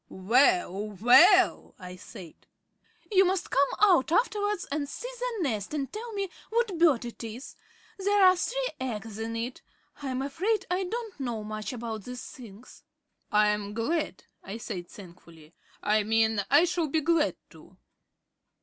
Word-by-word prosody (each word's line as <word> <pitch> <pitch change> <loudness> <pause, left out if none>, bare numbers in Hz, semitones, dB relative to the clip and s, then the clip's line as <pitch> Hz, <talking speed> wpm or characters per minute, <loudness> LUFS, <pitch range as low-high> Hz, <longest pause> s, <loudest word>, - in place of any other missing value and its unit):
"Well, 215 - +2
well!" 360 - +5
I 180 0 -9
said. 185 -2 -11 0.8
"You 385 -2 +6
must 370 -1 -1
come 280 +1 +3
out 365 -9 +4
afterwards 415 -1 +1
and 285 -1 -2
see - - -6
the 485 -6 -2
nest 220 -1 -2
and 275 -3 -3
tell 455 +2 -6
me 395 -1 -2 0.2
what 460 -4 0
bird 300 -8 +4
it 235 0 -8
is. 230 +4 -8 0.4
There 405 +1 +3
are 370 0 +7
three - - -2
eggs 225 -4 -5
in 225 +1 -4
it. 235 +3 -4 0.4
I 280 - -5
am 260 0 -2
afraid 385 +9 -1
I 370 +1 0
don't 445 -2 -6
know 240 -5 -3
much 215 +2 -5
about 225 -4 -6
these 250 0 -7
things." 235 -3 -13 0.5
"I'm 210 0 +1
glad," 230 - -2 0.2
I 200 +3 -6
said 180 -6 -6
thankfully. 170 -4 -15 0.3
"I 215 +1 +3
mean, 220 0 +1
I 290 +4 +6
shall 345 -2 -1
be 310 +2 0
glad 325 -1 +2 0.2
to." - - -17
265 Hz, 155 wpm, -28 LUFS, -, 0.8 s, are